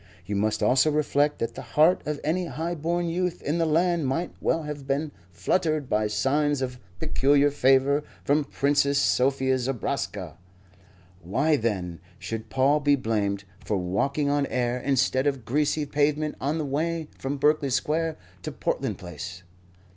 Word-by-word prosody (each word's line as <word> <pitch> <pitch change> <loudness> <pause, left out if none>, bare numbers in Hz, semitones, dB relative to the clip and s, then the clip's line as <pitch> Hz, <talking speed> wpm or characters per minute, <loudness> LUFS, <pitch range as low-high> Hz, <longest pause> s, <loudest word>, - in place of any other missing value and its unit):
You 100 +3 -3
must 105 +2 0
also 130 +7 +4
reflect 150 -1 +1
that 115 0 -3
the - - -7
heart 160 +4 +3
of 150 -1 -2
any 175 +4 0
high 165 +2 -3
born 170 +2 -1
youth 180 +1 -1
in 155 +4 -1
the 165 - +2
land 170 -1 +2
might 165 +7 -1
well 165 - +1
have 145 -2 -6
been 145 +2 -1 0.2
fluttered 155 - 0
by 105 -1 +1
signs 135 +6 +1
of 125 -1 -4 0.2
peculiar 145 -2 +3
favour 135 +1 +3 0.2
from 145 +1 +2
Princess 140 0 +1
Sophie 130 -1 +2
Zobraska. 130 -2 -3 0.8
Why, 135 - +1
then, 95 - -2 0.2
should 110 -1 -6
Paul 135 +4 +3
be 145 -1 +3
blamed 105 -6 -1 0.2
for 105 - -1
walking 100 +11 0
on 145 -1 +1
air 125 0 -1
instead 135 +1 +1
of 135 -5 -1
greasy 150 +4 +1
pavement 150 +1 0
on 145 +4 0
the 155 - -2
way 160 +3 -1
from 135 +2 -3
Berkeley 150 0 +2
Square 155 +5 0 0.2
to - - -5
Portland - - -2
Place? 90 +2 -8
140 Hz, 155 wpm, -26 LUFS, 125-150 Hz, 0.8 s, also